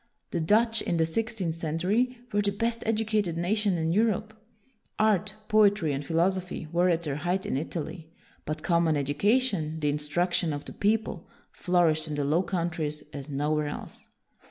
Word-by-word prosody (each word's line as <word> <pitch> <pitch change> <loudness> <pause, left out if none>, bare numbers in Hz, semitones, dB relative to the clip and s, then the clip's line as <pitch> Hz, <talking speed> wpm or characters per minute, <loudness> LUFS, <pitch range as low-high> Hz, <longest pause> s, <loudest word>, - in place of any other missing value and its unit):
The 175 - -1
Dutch, 225 +7 +3
in 170 - -1
the 160 - +3
sixteenth 205 -1 -2
century, 180 +11 0 0.2
were 205 - +3
the 205 - +1
best 230 +3 -1
educated 215 -6 0
nation 195 +2 +1
in 160 0 0
Europe. 215 +2 +1 0.6
Art, 210 -1 +2
poetry, 205 -7 +4
and 140 +1 -3
philosophy 175 +1 0
were 175 +2 +3
at 170 -1 +1
their 145 -3 -2
height 180 +5 -1
in - - -1
Italy; 160 +2 -4 0.3
but 155 +1 -4
common 170 -3 +2
education, 160 - +1
the 150 -1 +1
instruction 160 +3 0
of 145 0 -5
the - - -8
people, 210 -4 -1 0.2
flourished 165 -3 +2
in 150 - -3
the 145 -1 -1
Low 155 +5 +3
Countries 170 -4 -2
as 140 0 -7
nowhere 150 +2 0
else. 145 - -8
175 Hz, 160 wpm, -28 LUFS, 155-205 Hz, 0.6 s, poetry